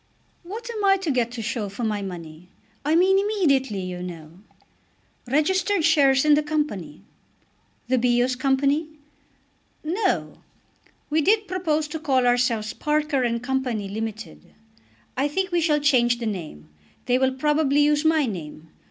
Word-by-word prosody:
"What 430 +7 -8
am 430 -3 -4
I 390 0 +5
to 365 -5 -2
get 245 -3 0
to 230 -2 -5
show 220 -2 -3
for 200 +5 -6
my 210 -2 -1
money; 175 -2 -8 0.3
I 300 +3 +1
mean 380 +3 +4
immediately, 280 - +1
you 180 -1 -5
know?" 170 -1 -9 0.9
"Registered 345 +6 +1
shares 280 -4 +4
in 300 - +6
the 295 - +4
Company." 295 - -3 0.8
"The 255 0 +2
Bios 245 +1 +2
Company?" 275 +4 +1 1.0
"No; 355 +8 -1 0.7
we 315 +1 +3
did 420 +5 +2
propose 315 -5 -1
to 320 - -5
call 265 -4 +1
ourselves 245 -3 +1
Parker 300 -2 0
and 235 -1 -1
Co., 265 +1 -3
limited. 220 -3 -5 0.6
I 275 +3 +1
think 375 +5 -2
we 345 -1 +1
shall 305 -2 +2
change 245 -5 +3
the 235 - -5
name. 160 - -6 0.4
They 250 0 +2
will 265 0 +2
probably 295 0 +2
use 295 0 +3
my 315 -2 +3
name. 165 -7 -7
270 Hz, 150 wpm, -24 LUFS, 225-310 Hz, 1.0 s, in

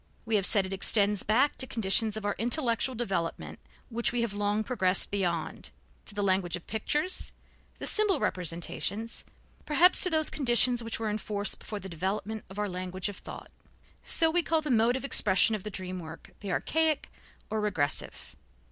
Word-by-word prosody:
We 225 -1 0
have 200 -2 +2
said 200 -4 +2
it 190 - -5
extends 200 +1 +3
back 250 +7 +2
to 260 - +1
conditions 220 -1 +1
of 215 - -6
our 205 - 0
intellectual 240 +1 +1
development 195 -8 -3 0.3
which 235 0 0
we 240 0 -1
have 225 -3 -2
long 205 +1 0
progressed 195 -6 0
beyond, 175 -5 -2 0.4
to 210 - -4
the 205 - -1
language 185 -3 +1
of 175 - -9
pictures, 295 - -1 0.4
the - - -6
symbol 425 -3 +4
representations, 185 +6 -2 0.4
perhaps 345 +5 +5
to 365 - +4
those 315 -2 +2
conditions 245 -2 +3
which 230 -1 -4
were 220 -2 -2
in 210 - -2
force 205 -2 -1
before 210 -1 -7
the 195 - -8
development 195 +5 -4
of 190 - -11
our 210 0 -1
language 185 +1 -4
of 200 - -8
thought. - - -10 0.5
So 325 -1 +2
we 350 +2 +3
called 320 -1 0
the 295 - -2
mode 230 +1 +3
of 265 - -4
expression 215 -4 +5
of 215 - -2
the 210 - -6
dream 185 -2 -6
work 160 -2 -10
the 200 -2 -5
archaic 315 - 0 0.4
or 215 0 -1
regressive. 180 -9 -3
215 Hz, 185 wpm, -29 LUFS, 190-245 Hz, 0.5 s, perhaps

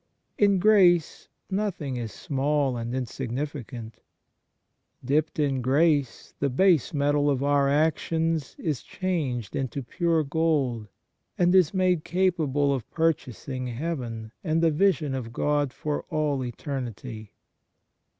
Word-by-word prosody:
In 200 -2 +4
grace 180 -4 +4 0.2
nothing 190 -9 -2
is 115 -3 -4
small 140 -1 0
and 120 +1 -4
insignificant. 125 -2 -5 1.1
Dipped 150 +4 +1
in 140 -4 +1
grace, 140 0 +1
the 140 - +1
base 170 +2 +3
metal 145 0 +2
of 135 -1 0
our 140 -1 +3
actions 160 +1 0
is 150 -6 -2
changed 145 - -3
into 135 0 -3
pure 165 +4 +1
gold, 140 -7 0 0.5
and 175 0 +3
is 185 -5 +5
made 185 -4 +1
capable 155 -6 +1
of 130 -5 -4
purchasing 135 -5 -2
heaven 120 -5 -4
and 165 -1 +1
the 165 - +4
vision 155 -4 +2
of 125 -3 -4
God 145 +2 0
for 150 +2 -3
all 150 -3 0
eternity. 120 -4 -6
145 Hz, 120 wpm, -26 LUFS, 130-165 Hz, 1.1 s, is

